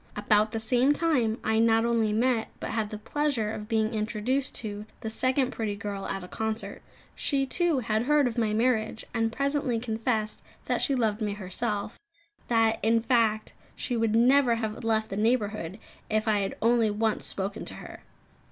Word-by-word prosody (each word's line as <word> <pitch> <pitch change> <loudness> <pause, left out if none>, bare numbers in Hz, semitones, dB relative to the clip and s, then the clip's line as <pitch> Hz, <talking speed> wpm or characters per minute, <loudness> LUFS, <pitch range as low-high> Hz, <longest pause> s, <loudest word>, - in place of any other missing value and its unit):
About 215 0 +2
the 225 - -2
same 250 +5 +3
time, 265 -9 +1
I 220 0 +2
not 225 0 +4
only 230 -2 +2
met, 230 +1 +1
but - - -4
had 220 -2 -1
the 215 - -5
pleasure 255 -2 -1
of 210 -1 -6
being 220 0 +1
introduced 220 +5 -1
to, 210 -1 -5
the 220 - -4
second 255 +3 +1
pretty 215 -3 -3
girl 200 -1 -5
at 195 -1 -3
a - - -8
concert. 220 +3 -4 0.3
She, 275 -2 0
too, 330 0 +1
had 220 0 0
heard 295 -1 +4
of 235 - -3
my 225 -3 +1
marriage; 220 -1 0
and 225 -1 +1
presently 275 -2 0
confessed 220 -2 -2 0.2
that - - 0
she 275 - +1
loved 220 -3 0
me 210 -1 -1
herself; 205 +2 -3 0.5
that, 225 -1 +3
in 225 +1 +3
fact, 225 -2 +1 0.2
she 250 - -3
would 225 -1 +1
never 250 +1 +5
have 220 -1 -4
left 220 -1 +1
the 195 - -4
neighbourhood 210 -5 0 0.3
if 215 +1 0
I 210 -1 +3
had 195 -1 -2
only 230 -1 +4
once 215 +1 0
spoken 195 +1 -3
to - - -6
her. - - -10
225 Hz, 180 wpm, -27 LUFS, 215-245 Hz, 0.5 s, never